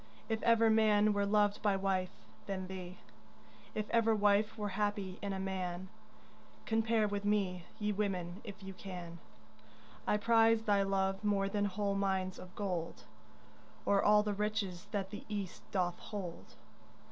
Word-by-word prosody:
If 220 0 0
ever 230 -1 +5
man 215 -1 +4
were 200 0 +1
loved 205 0 +3
by 205 -2 +3
wife, 190 -1 0 0.4
then 190 -2 -3
thee; 185 -1 -7 0.8
If 215 -1 -2
ever 225 -1 +4
wife 210 +1 +3
were 210 -1 -2
happy 200 -1 -2
in 200 - -2
a 190 - -3
man, 185 -1 -3 0.8
Compare 225 -1 +2
with 205 0 -3
me, 195 -4 0
ye 210 0 0
women, 190 -2 -2
if 205 -2 -9
you 195 0 -7
can. 180 -3 -8 0.9
I 210 - +3
prize 225 0 +4
thy 205 -2 +3
love 195 0 0
more 200 -1 +2
than 205 +1 0
whole 200 0 -1
mines 190 -2 0
of 185 +1 -11
gold 180 -5 -3 0.8
Or 200 -1 +4
all 210 0 +6
the 210 -1 -1
riches 205 -3 -2
that 195 -1 -3
the 205 - -7
East 200 -4 -4
doth 180 -2 0
hold. 190 -5 -7
200 Hz, 155 wpm, -34 LUFS, 190-210 Hz, 0.9 s, all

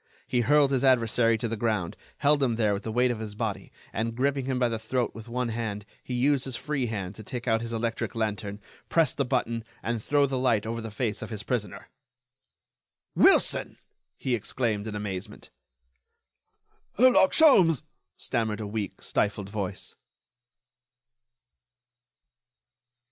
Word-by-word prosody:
He 125 - +1
hurled 145 +3 +4
his 135 -1 +1
adversary 115 -3 +3
to 115 - -2
the 115 - -2
ground, 105 -6 -1 0.2
held 145 0 +3
him 125 -4 +2
there 110 -3 +2
with 100 - -3
the 110 - -5
weight 125 +2 +2
of 115 - -4
his 105 -2 -6
body, 110 -2 -4 0.2
and, 115 +2 -2
gripping 135 +1 0
him 130 -1 -1
by 125 -1 +2
the 115 -1 -3
throat 120 +2 -1
with 115 +1 -10
one 125 0 -1
hand, 110 -3 -4 0.2
he 125 - -4
used 135 +2 +2
his 130 -2 -3
free 140 -3 -2
hand 100 -4 -4
to 110 - -11
take 125 +2 -6
out 115 -1 +2
his 115 0 -5
electric 115 0 -2
lantern, 105 -2 -2 0.3
press 165 -5 +3
the 140 - 0
button, 120 -3 -1 0.2
and 115 -1 -2
throw 145 +4 +3
the 135 -2 -2
light 115 -5 +2
over 115 +1 -3
the 115 - -6
face 110 0 -2
of 110 - -6
his 105 -2 -5
prisoner. 105 -5 -3 1.3
"Wilson!" - - +4 0.4
he 130 - -2
exclaimed, 110 -2 -1
in 105 - -5
amazement. 105 0 -6 1.5
"Herlock 245 -5 +6
Sholmes!" 185 - +5 0.3
stammered 110 -2 -1
a 110 - -4
weak, 105 0 -4
stifled 100 -1 0
voice. 100 -3 -4
115 Hz, 160 wpm, -27 LUFS, 110-130 Hz, 1.5 s, Herlock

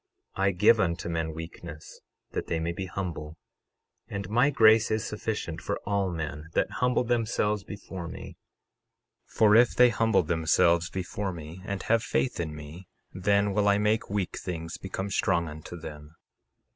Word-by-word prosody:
I 95 0 +2
give 105 +5 +4
unto 85 -3 0
men 80 -1 -1
weakness 80 -1 -9 0.3
that - - -3
they 80 - -1
may 85 +1 -1
be 95 +2 -5
humble; 85 -4 -5 0.7
and 100 -2 -5
my 120 +5 +4
grace 110 -4 +5
is 110 0 0
sufficient 105 -6 -4
for 100 - -3
all 100 -2 0
men 80 -2 -5
that - - +1
humble 125 0 +3
themselves 110 -4 0
before 95 -4 -7
me; 85 - -8 0.9
for 105 -1 +4
if 120 +1 +5
they 125 0 +7
humble 110 -4 +2
themselves 85 +1 +2
before 95 +2 -3
me, 85 +1 -9
and 100 -1 -4
have 115 0 +2
faith 125 +2 -1
in 80 -3 -3
me, 75 +5 -10 0.3
then 100 +1 +2
will 105 0 +2
I 100 0 +5
make 105 +2 +1
weak 100 -2 -2
things 85 -2 -5
become 95 +1 -4
strong 85 -2 +1
unto 80 +3 -8
them. 75 0 -10
95 Hz, 160 wpm, -28 LUFS, 85-105 Hz, 0.9 s, they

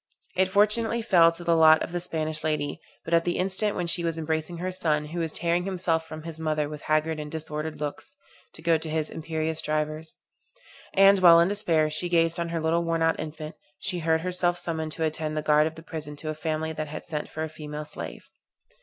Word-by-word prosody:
It 190 0 +2
fortunately 220 +4 +2
fell 170 -6 +6
to 170 +1 -7
the 170 -1 +3
lot 160 -1 +6
of - - -6
the 175 0 -2
Spanish 155 -3 -2
lady, 150 -2 -1 0.2
but 165 - -3
at 165 0 +5
the 175 - -1
instant 195 +3 +1
when 180 - -1
she 170 +1 0
was 165 -1 -1
embracing 160 +1 -2
her 185 +2 -3
son, 155 -4 0
who 165 +3 -5
was 165 -2 -1
tearing 170 +2 +1
himself 170 -4 0
from 155 -1 -8
his 165 -1 -7
mother 155 -2 0
with 150 -1 -8
haggard 155 +1 0
and 150 0 -6
disordered 155 0 -4
looks, 150 +5 -5 0.4
to 160 - -10
go 165 -1 +3
to 160 - -6
his 155 0 -1
imperious 160 0 -2
drivers; 155 +1 -2 0.8
and 195 0 +7
while 170 -2 +8
in 170 +2 +4
despair 165 -7 +1
she 175 +3 -2
gazed 165 -1 +2
on 170 0 -2
her 165 0 -2
little 165 +2 +1
worn 165 -1 0
out 165 0 +2
infant, 155 0 -6 0.2
she 180 +3 -2
heard 160 0 +1
herself 180 0 0
summoned 160 -3 -3
to 165 - -3
attend 155 0 -2
the 155 - -1
guard 150 0 +4
of 160 - -6
the 160 - -11
prison 150 -2 -6
to 155 +2 -6
a - - -1
family 160 0 -2
that 155 0 -4
had 155 +1 -7
sent 150 -3 -4
for 160 - -4
a - - -2
female 150 -1 -7
slave. - - -5
160 Hz, 225 wpm, -26 LUFS, 155-170 Hz, 0.8 s, while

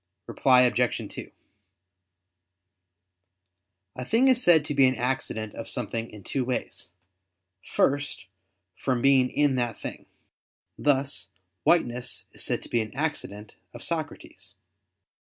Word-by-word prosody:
Reply 130 -2 +4
Obj. 125 -1 +1
2: - - -8 2.7
A 125 - -3
thing 230 - +3
is 255 -1 +4
said 165 -8 +6
to 150 - -2
be 135 -2 +5
an 130 - +1
accident 120 -4 -2
of 115 - -7
something 115 -1 -3
in 105 -2 -12
two 135 +6 -2
ways. 125 0 -4 0.7
First, 145 -2 0 0.5
from 130 -3 -1
being 135 -2 +5
in 145 -3 +2
that 120 -3 -2
thing: - - -8 0.7
thus, 140 -1 0 0.4
whiteness 125 -8 +1
is - - -6
said - - -1
to - - -13
be 120 - +1
an 110 +2 -7
accident 120 -9 -4 0.2
of - - -9
Socrates. 145 - -6
130 Hz, 125 wpm, -26 LUFS, 120-145 Hz, 2.7 s, said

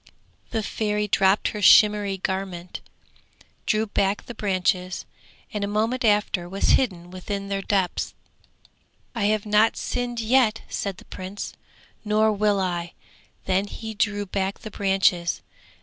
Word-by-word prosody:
The 225 -2 -2
Fairy 210 0 -1
dropped 195 0 +3
her 210 - -5
shimmering 205 -2 +5
garment, 190 -2 -4 0.9
drew 215 0 +2
back 200 -1 0
the 240 - -7
branches, 185 -3 -1 0.5
and 210 -1 -2
a - - 0
moment 225 +5 0
after 205 -5 +1
was 195 +2 0
hidden 180 -8 +1
within 200 +2 -5
their 195 0 -1
depths. 195 -2 -1 1.0
'I 230 -5 -1
have 215 0 +1
not 210 +1 +3
sinned 245 -1 -3
yet!' 225 -1 +2
said 195 -2 -3
the - - -14
Prince, 190 +2 -7 0.5
'nor 215 0 +3
will 210 -1 +2
I'; 175 -2 -2 0.5
then 190 +2 +1
he 220 +2 -7
drew 205 -1 0
back 195 0 -2
the 215 - -8
branches. 195 -3 +1
205 Hz, 135 wpm, -24 LUFS, 190-215 Hz, 1.0 s, shimmering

